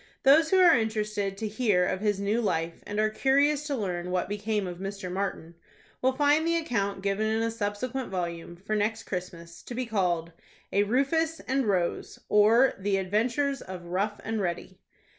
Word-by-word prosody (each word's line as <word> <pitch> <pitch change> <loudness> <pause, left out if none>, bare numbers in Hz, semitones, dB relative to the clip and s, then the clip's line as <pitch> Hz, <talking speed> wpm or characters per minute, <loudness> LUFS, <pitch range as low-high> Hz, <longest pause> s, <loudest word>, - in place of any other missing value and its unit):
Those 310 +4 +6
who 380 - +4
are 360 -3 +7
interested 215 -3 -1
to 220 - -3
hear 210 -4 +2
of 185 - -1
his 205 -2 +1
new 205 +4 0
life, 165 -6 -2
and 205 +1 -3
are 215 0 +2
curious 280 +5 +2
to 285 - -1
learn 180 -6 -3
what 180 0 -1
became 205 0 -2
of 175 -1 -6
Mr. 195 -1 -5
Martin, 185 -3 -3 0.5
will 260 - +3
find 295 +3 +3
the 335 0 +2
account 200 -11 -2
given 200 +2 0
in 220 +1 0
a 230 - 0
subsequent 230 +4 -3
volume, 170 -2 -4
for 195 +5 -4
next 220 +2 -1
Christmas, 170 -2 -7
to 240 - -8
be 255 +1 -2
called 175 -7 0 0.4
a 200 - +4
"RUFUS 280 +9 +1
AND 265 -2 -1
ROSE; 180 -4 -1
or, 225 +5 +5
The 195 0 0
Adventures 235 +8 0
of 185 -2 -8
Rough 200 +4 -2
and 220 -1 -2
Ready." 185 +1 -4
210 Hz, 180 wpm, -27 LUFS, 190-250 Hz, 0.5 s, are